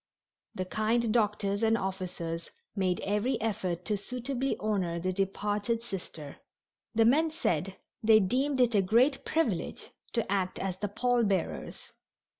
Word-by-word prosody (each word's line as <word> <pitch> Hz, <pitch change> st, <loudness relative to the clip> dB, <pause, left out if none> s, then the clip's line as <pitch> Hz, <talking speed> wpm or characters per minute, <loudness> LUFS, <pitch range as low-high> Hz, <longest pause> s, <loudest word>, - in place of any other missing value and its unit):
The 185 Hz, -, -2 dB
kind 220 Hz, +3 st, +1 dB
doctors 205 Hz, -2 st, +1 dB
and 225 Hz, 0 st, +3 dB
officers 180 Hz, -4 st, -4 dB, 0.3 s
made 185 Hz, -3 st, 0 dB
every 210 Hz, +5 st, 0 dB
effort 185 Hz, -6 st, -2 dB
to 210 Hz, -, 0 dB
suitably 250 Hz, +5 st, -2 dB
honor 190 Hz, -6 st, 0 dB
the 185 Hz, +2 st, -1 dB
departed 205 Hz, +4 st, -1 dB
Sister. 170 Hz, -9 st, -7 dB, 0.6 s
The 225 Hz, 0 st, +5 dB
men 305 Hz, +7 st, +4 dB
said 195 Hz, -, -1 dB, 0.2 s
they 220 Hz, 0 st, +7 dB
deemed 260 Hz, +7 st, +1 dB
it 245 Hz, -2 st, +4 dB
a 205 Hz, -, +5 dB
great 245 Hz, +9 st, +3 dB
privilege 275 Hz, -, -1 dB, 0.2 s
to 230 Hz, -5 st, -1 dB
act 190 Hz, -2 st, 0 dB
as 190 Hz, -2 st, -3 dB
the 205 Hz, -, -2 dB
pall 240 Hz, +3 st, +1 dB
bearers. 195 Hz, -4 st, -2 dB
210 Hz, 140 wpm, -30 LUFS, 185-235 Hz, 0.6 s, they